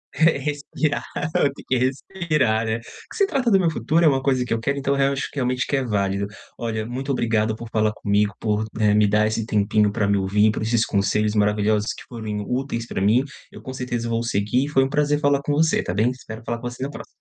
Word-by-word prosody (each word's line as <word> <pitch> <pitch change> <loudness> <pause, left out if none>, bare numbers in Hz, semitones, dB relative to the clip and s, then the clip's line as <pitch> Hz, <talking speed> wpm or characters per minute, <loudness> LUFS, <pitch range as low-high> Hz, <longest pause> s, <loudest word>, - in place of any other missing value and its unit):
respirar, 150 -1 0 0.3
tem 140 -1 0
que 130 - +1
respirar, 130 - 0
né, 110 +1 0
o - - -11
que 120 - -14
se 400 - +4
trata 265 -10 0
do 195 -2 +5
meu 175 - +2
futuro, 165 +2 +1
é - - +7
uma 135 -3 +3
coisa 130 -2 +1
que 120 - -1
eu 115 - 0
quero. 140 +4 -1
Então 140 0 0
eu 140 0 +2
acho 140 - -2
que - - -13
realmente 125 -1 0
que - - 0
é 135 - +1
válido. 100 -3 -1 0.3
Olha, 110 -2 -3
muito 130 +4 -4
obrigado 110 -3 +1
por 115 +1 -8
falar 110 -1 +2
comigo 105 0 +1
por, 105 -1 0 0.2
eh, 105 -1 +4
me 105 0 +4
dar 105 +1 +3
esse 110 +1 -1
tempinho 105 -1 +2
para 105 -1 0
me 100 0 +2
ouvir, 105 +3 +3
por 110 - -4
esses 115 +1 +1
conselhos 105 +1 +1
maravilhosos 105 +1 +1
que - - -11
foram 110 -3 -5
úteis 125 -2 -2
para - - -3
mim, 110 +7 +4 0.3
eu - - -11
com 130 - -7
certeza 120 -2 -3
vou 115 0 0
seguir. 115 +5 0
Foi 135 -3 +3
um 135 - -1
prazer 145 +1 +1
falar 145 -1 +2
com 145 - -2
você. 160 +2 +3
Tá 90 - -3
bem. 110 +5 +2
Espero 115 -3 -9
falar 120 0 -3
com 120 - -4
você 120 +1 -7
na 135 - -2
próxima. - - -9
115 Hz, 240 wpm, -23 LUFS, 105-140 Hz, 0.3 s, é